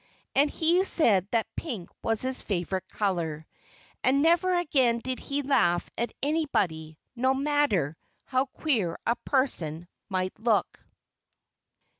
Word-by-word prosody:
And 285 Hz, +2 st, +4 dB
he 335 Hz, +5 st, +2 dB
said 210 Hz, -, +4 dB
that 225 Hz, -1 st, +1 dB
pink 230 Hz, -, -5 dB
was 225 Hz, 0 st, 0 dB
his 260 Hz, 0 st, -2 dB
favorite 185 Hz, -1 st, -3 dB
color. 165 Hz, -6 st, -2 dB, 0.6 s
And 275 Hz, +2 st, +3 dB
never 345 Hz, +3 st, +3 dB
again 265 Hz, -8 st, +2 dB
did 255 Hz, +2 st, -4 dB
he 285 Hz, +1 st, -3 dB
laugh 210 Hz, -11 st, +2 dB
at 235 Hz, -1 st, -2 dB
anybody, 190 Hz, -, -1 dB, 0.2 s
no 260 Hz, +2 st, +2 dB
matter 275 Hz, -, +1 dB, 0.3 s
how 260 Hz, +1 st, 0 dB
queer 230 Hz, -, -1 dB
a 235 Hz, -, +2 dB
person 175 Hz, -, 0 dB, 0.2 s
might 185 Hz, -1 st, -1 dB
look. 220 Hz, -2 st, 0 dB
240 Hz, 125 wpm, -27 LUFS, 185-285 Hz, 0.6 s, And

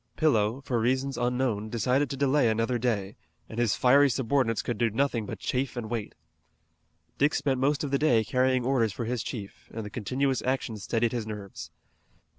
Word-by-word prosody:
Pillow, 120 Hz, -5 st, +2 dB
for 125 Hz, -4 st, -1 dB
reasons 130 Hz, +4 st, 0 dB
unknown, 120 Hz, -3 st, -1 dB
decided 125 Hz, +5 st, +1 dB
to 135 Hz, -, -4 dB
delay 140 Hz, -2 st, +3 dB
another 115 Hz, +2 st, 0 dB
day, 105 Hz, -5 st, -1 dB, 0.3 s
and 110 Hz, -, -6 dB
his 120 Hz, -4 st, +2 dB
fiery 140 Hz, +3 st, +5 dB
subordinates 125 Hz, -2 st, +1 dB
could 120 Hz, -4 st, -3 dB
do 115 Hz, -, +3 dB
nothing 115 Hz, -2 st, 0 dB
but -, -, -5 dB
chafe 130 Hz, 0 st, -2 dB
and 115 Hz, -2 st, -5 dB
wait. 115 Hz, -3 st, -4 dB, 1.0 s
Dick 145 Hz, +2 st, +3 dB
spent 135 Hz, -2 st, 0 dB
most 145 Hz, +3 st, +1 dB
of 145 Hz, -, -3 dB
the 140 Hz, -, +2 dB
day 120 Hz, -8 st, +3 dB
carrying 130 Hz, +1 st, +1 dB
orders 125 Hz, -5 st, +2 dB
for 115 Hz, -, -4 dB
his 120 Hz, 0 st, -2 dB
chief, 100 Hz, -5 st, -7 dB
and 110 Hz, -1 st, -5 dB
the 105 Hz, -, -7 dB
continuous 130 Hz, +5 st, -1 dB
action 130 Hz, -3 st, -1 dB
steadied 115 Hz, +3 st, 0 dB
his 115 Hz, -3 st, -3 dB
nerves. 105 Hz, -3 st, -7 dB
125 Hz, 185 wpm, -28 LUFS, 110-135 Hz, 1.0 s, fiery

